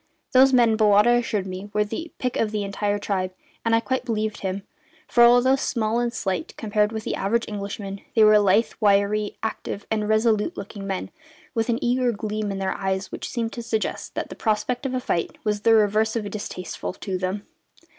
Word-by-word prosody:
Those 265 Hz, 0 st, +6 dB
men, 235 Hz, -4 st, +4 dB
Bowata 210 Hz, +1 st, +5 dB
assured 215 Hz, -5 st, -2 dB
me, 190 Hz, +2 st, -6 dB
were 210 Hz, 0 st, +3 dB
the 225 Hz, +11 st, -6 dB
pick 250 Hz, -1 st, -2 dB
of 220 Hz, -, +1 dB
the 210 Hz, -1 st, -2 dB
entire 205 Hz, +1 st, -1 dB
tribe, 185 Hz, -2 st, -2 dB, 0.3 s
and 230 Hz, 0 st, +3 dB
I -, -, +4 dB
quite 260 Hz, +2 st, -1 dB
believed 215 Hz, -2 st, -2 dB
him, 195 Hz, 0 st, -3 dB, 0.4 s
for, 240 Hz, -, +5 dB
although 245 Hz, +2 st, +6 dB
small 230 Hz, -4 st, 0 dB
and 240 Hz, 0 st, 0 dB
slight 185 Hz, -8 st, -3 dB
compared 210 Hz, -1 st, +1 dB
with 220 Hz, -1 st, -4 dB
the -, -, -2 dB
average 230 Hz, +4 st, 0 dB
Englishman, 200 Hz, -1 st, -5 dB
they 220 Hz, -, +6 dB
were 215 Hz, 0 st, +7 dB
lithe, 205 Hz, +3 st, +3 dB
wiry, 205 Hz, 0 st, +2 dB
active, 210 Hz, -2 st, -4 dB
and 215 Hz, -1 st, 0 dB
resolute 220 Hz, +6 st, +2 dB
looking 200 Hz, 0 st, -7 dB
men, 190 Hz, -1 st, -3 dB, 0.4 s
with 225 Hz, -1 st, -1 dB
an 230 Hz, -, +2 dB
eager 245 Hz, 0 st, +2 dB
gleam 215 Hz, -1 st, -3 dB
in 195 Hz, -, -3 dB
their 190 Hz, 0 st, -1 dB
eyes 190 Hz, 0 st, -2 dB
which -, -, -5 dB
seemed 230 Hz, -2 st, -3 dB
to 240 Hz, -, -5 dB
suggest 225 Hz, -2 st, -3 dB
that -, -, -3 dB
the -, -, -8 dB
prospect 245 Hz, +5 st, -1 dB
of 255 Hz, -, -3 dB
a -, -, +1 dB
fight 170 Hz, -8 st, -2 dB
was 210 Hz, -1 st, -1 dB
the 225 Hz, +1 st, +5 dB
reverse 215 Hz, +1 st, +3 dB
of 215 Hz, -3 st, -2 dB
distasteful 185 Hz, -4 st, -5 dB
to 185 Hz, -1 st, -4 dB
them. 190 Hz, +2 st, -3 dB
215 Hz, 200 wpm, -24 LUFS, 200-230 Hz, 0.4 s, were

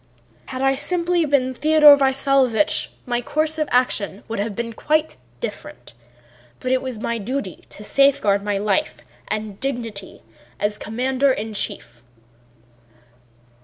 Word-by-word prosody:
"Had 260 Hz, +1 st, -4 dB
I 270 Hz, -, +4 dB
been 270 Hz, -, -3 dB
simply 345 Hz, +1 st, 0 dB
Theodore 290 Hz, +3 st, +6 dB
Vasílyevich 270 Hz, -1 st, +2 dB, 0.2 s
my 240 Hz, -2 st, -1 dB
course 310 Hz, +5 st, -1 dB
of 305 Hz, -, -1 dB
action 215 Hz, -5 st, +1 dB
would 225 Hz, -2 st, -4 dB
have 205 Hz, 0 st, -2 dB
been 230 Hz, +1 st, -4 dB
quite 310 Hz, +6 st, 0 dB, 0.2 s
different, -, -, -8 dB, 0.7 s
but 255 Hz, -, -2 dB
it 260 Hz, -, +2 dB
was 255 Hz, -3 st, -4 dB
my 230 Hz, +1 st, -2 dB
duty 210 Hz, -, -5 dB
to 210 Hz, -, -12 dB
safeguard 215 Hz, -6 st, +3 dB
my 205 Hz, 0 st, -1 dB
life 215 Hz, +10 st, -1 dB, 0.3 s
and 215 Hz, -2 st, -4 dB
dignity 230 Hz, -7 st, -5 dB, 0.4 s
as 210 Hz, +1 st, -1 dB
commander 260 Hz, +4 st, 0 dB
in 220 Hz, -3 st, -3 dB
chief." 120 Hz, -, -5 dB
255 Hz, 130 wpm, -21 LUFS, 215-280 Hz, 0.7 s, Theodore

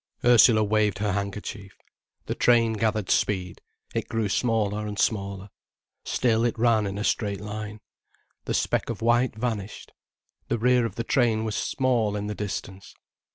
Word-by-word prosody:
Ursula 120 Hz, -2 st, +6 dB
waved 105 Hz, -1 st, +1 dB
her 105 Hz, 0 st, -1 dB
handkerchief. 100 Hz, 0 st, -5 dB, 0.5 s
The -, -, -2 dB
train 115 Hz, -2 st, +3 dB
gathered 110 Hz, -2 st, -1 dB
speed, 90 Hz, -3 st, 0 dB, 0.3 s
it -, -, -3 dB
grew 115 Hz, -3 st, -1 dB
smaller 105 Hz, -2 st, 0 dB
and 105 Hz, -1 st, -5 dB
smaller. 100 Hz, -2 st, -1 dB, 0.5 s
Still 115 Hz, -2 st, +1 dB
it 120 Hz, -1 st, 0 dB
ran 110 Hz, -3 st, +3 dB
in 100 Hz, +1 st, -5 dB
a 105 Hz, -, -3 dB
straight 100 Hz, -3 st, -1 dB
line. 105 Hz, +1 st, -6 dB, 0.6 s
The -, -, -1 dB
speck -, -, 0 dB
of 115 Hz, -1 st, -4 dB
white 120 Hz, 0 st, +2 dB
vanished. 110 Hz, -3 st, -4 dB, 0.6 s
The 120 Hz, -, 0 dB
rear 125 Hz, +1 st, +3 dB
of -, -, -11 dB
the 115 Hz, -, -3 dB
train 115 Hz, -4 st, +1 dB
was 110 Hz, -2 st, -3 dB
small 120 Hz, -6 st, 0 dB
in 105 Hz, 0 st, -3 dB
the 105 Hz, -, -3 dB
distance. 100 Hz, -2 st, -6 dB
110 Hz, 155 wpm, -25 LUFS, 100-115 Hz, 0.6 s, Ursula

